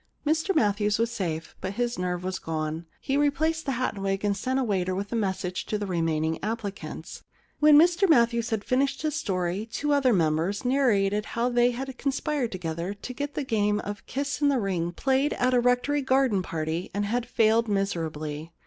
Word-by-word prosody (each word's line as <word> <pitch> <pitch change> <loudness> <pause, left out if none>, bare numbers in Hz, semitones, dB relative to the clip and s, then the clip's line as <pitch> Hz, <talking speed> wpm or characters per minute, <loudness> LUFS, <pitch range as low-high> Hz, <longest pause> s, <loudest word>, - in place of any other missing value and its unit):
Mr 320 +5 +1
Matthews 210 -5 +2
was 230 +1 0
safe, 165 -7 -4
but 190 - -3
his 240 -1 -2
nerve 180 -1 -2
was 185 0 -3
gone. 160 +1 -3
He 275 - -1
replaced 310 +2 +1
the 270 - +1
hat 255 +1 -1
and 200 - -8
wig, 195 +1 -1
and 200 -1 +1
sent 255 +6 -1
a 270 - +1
waiter 185 -5 0
with 200 +2 -4
a - - -1
message 190 -4 -2
to 210 - -1
the 205 - -3
remaining 160 -3 -1
applicants. 210 -2 -5 0.4
When 300 -1 +7
Mr 350 +4 +5
Matthews 235 -4 +3
had 220 -3 -1
finished 275 +4 0
his 305 -1 0
story 185 +2 -2
two 295 0 0
other 275 -3 +3
members 170 +3 +1
narrated 210 -6 +2
how 240 +2 +2
they 240 0 +4
had 260 +1 -5
conspired 280 -2 -1
together 175 +1 -4
to 230 +5 -7
get 285 +2 -4
the 295 - -1
game 210 -4 +1
of 205 0 -7
kiss 280 0 -3
in 290 - +4
the 275 - +2
ring 180 -5 -1
played 265 - +1
at 255 +1 +1
a 250 - +5
rectory 250 +4 +2
garden 260 -6 +2
party 165 0 -3
and 205 0 0
had 240 +3 -1
failed 225 0 +3
miserably. 165 -6 -2
215 Hz, 195 wpm, -26 LUFS, 185-265 Hz, 0.4 s, When